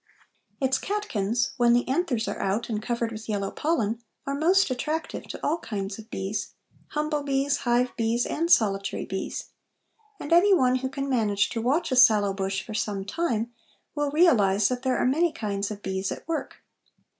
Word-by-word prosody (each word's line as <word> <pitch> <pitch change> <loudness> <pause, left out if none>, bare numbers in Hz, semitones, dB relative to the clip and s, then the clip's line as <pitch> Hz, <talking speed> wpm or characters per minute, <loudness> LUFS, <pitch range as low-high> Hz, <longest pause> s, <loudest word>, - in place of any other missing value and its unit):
Its 265 -1 +1
catkins, 240 - -1
when 240 -1 +4
the 245 +1 +2
anthers 260 -5 0
are - - -4
out 195 +5 -1
and 215 -2 -2
covered 235 0 -2
with 220 0 -8
yellow 200 -2 -1
pollen, 235 -8 -1 0.2
are 275 - -2
most 335 +3 +3
attractive 310 +6 -3
to - - -7
all 320 +3 +1
kinds 200 -6 -5
of 220 +1 -12
bees, 195 0 -4 0.3
humble 300 0 -1
bees, 275 0 +1
hive 245 +1 +2
bees, 230 +1 +1
and 335 +2 -1
solitary 195 - +2
bees, 190 - -5 0.7
and 290 - -2
any 380 +3 +6
one 255 -5 +3
who 260 +1 -3
can 275 +1 -4
manage 215 -6 +1
to 230 - -3
watch 290 +7 +1
a - - +2
sallow 215 -5 +6
bush 195 0 -2
for 215 - -7
some 205 -2 -2
time 235 -3 -1 0.4
will 290 -1 -1
realize 215 - +4
that 250 -1 -2
there 260 -1 +1
are - - +1
many 315 +6 +2
kinds 200 -6 -3
of 210 -1 -7
bees 190 0 -2
at - - -7
work. 330 -2 -4
240 Hz, 180 wpm, -26 LUFS, 210-290 Hz, 0.7 s, any